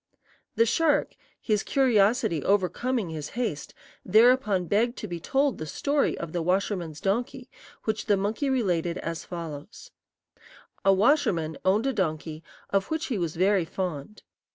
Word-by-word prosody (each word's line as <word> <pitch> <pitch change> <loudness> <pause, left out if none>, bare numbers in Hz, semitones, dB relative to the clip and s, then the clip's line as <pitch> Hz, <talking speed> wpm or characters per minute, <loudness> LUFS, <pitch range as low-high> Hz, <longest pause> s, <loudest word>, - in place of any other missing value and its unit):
The 230 - +4
shark, 315 +6 +2 0.3
his 210 -3 0
curiosity 220 - +2
overcoming 205 +2 0
his 155 -2 -5
haste, 220 -13 -3 0.3
thereupon 215 -2 +4
begged 230 +7 +1
to 215 - -5
be 175 -2 -5
told 270 - 0
the 155 - -5
story 285 - 0
of 170 -2 -6
the 175 - -1
washerman's 180 -3 -1
donkey, 240 +5 -2 0.3
which 220 0 -2
the 205 -2 +4
monkey 215 +8 -1
related 180 -10 0
as 165 0 -5
follows: 170 - -8 0.9
"A 195 - +5
washerman 190 - +2
owned 205 +6 +2
a 270 - +1
donkey, 155 -5 -2 0.3
of 195 -1 +1
which 315 0 -2
he 210 - -1
was 170 -3 -2
very 190 +1 +3
fond. 175 +2 -5
195 Hz, 145 wpm, -26 LUFS, 170-240 Hz, 0.9 s, A